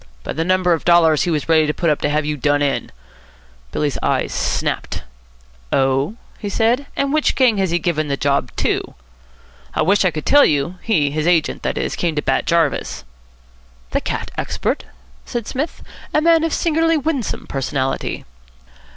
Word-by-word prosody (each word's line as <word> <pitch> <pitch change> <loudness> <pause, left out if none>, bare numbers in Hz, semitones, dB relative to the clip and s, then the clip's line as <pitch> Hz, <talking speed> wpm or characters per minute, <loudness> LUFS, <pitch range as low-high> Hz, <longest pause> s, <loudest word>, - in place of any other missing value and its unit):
"By - - -4
the 160 - -1
number 185 0 +2
of 165 - -2
dollars 165 -3 +4
he - - -1
was 155 -3 -1
ready 160 -2 +4
to 150 - -1
put 170 -3 +1
up 150 - -1
to 145 - +1
have 150 0 0
you 150 0 -1
done 145 +1 +1
in." 140 -1 -1 0.8
Billy's 145 -2 -1
eyes - - 0
snapped. - - -2 0.7
"Oh?" 135 +8 +1 0.2
he 205 - -4
said. 240 +7 +1
"And 280 0 0
which 310 -1 +2
gang 250 -5 +4
has 190 -2 +1
he 170 - +1
given 155 -3 -1
the 140 -1 -1
job 140 -3 +1
to?" - - -1 0.8
"I - - +2
wish 200 +5 +3
I 185 - +4
could 155 -3 -6
tell 290 0 +6
you. 155 +5 +1
He 155 -11 +1
his 155 +2 -1
agent, 170 -3 +2
that - - -2
is - - -2
came 170 -3 -1
to 150 - -1
Bat - - 0
Jarvis." 170 - 0 0.9
"The - - 0
cat - - -4
expert?" - - -2 0.4
said 235 -2 -4
Psmith. 285 +9 -4 0.3
"A - - +6
man 330 0 +4
of 330 - 0
singularly 330 0 +2
winsome 285 -5 -2
personality." 135 0 -2
170 Hz, 180 wpm, -19 LUFS, 150-230 Hz, 0.9 s, tell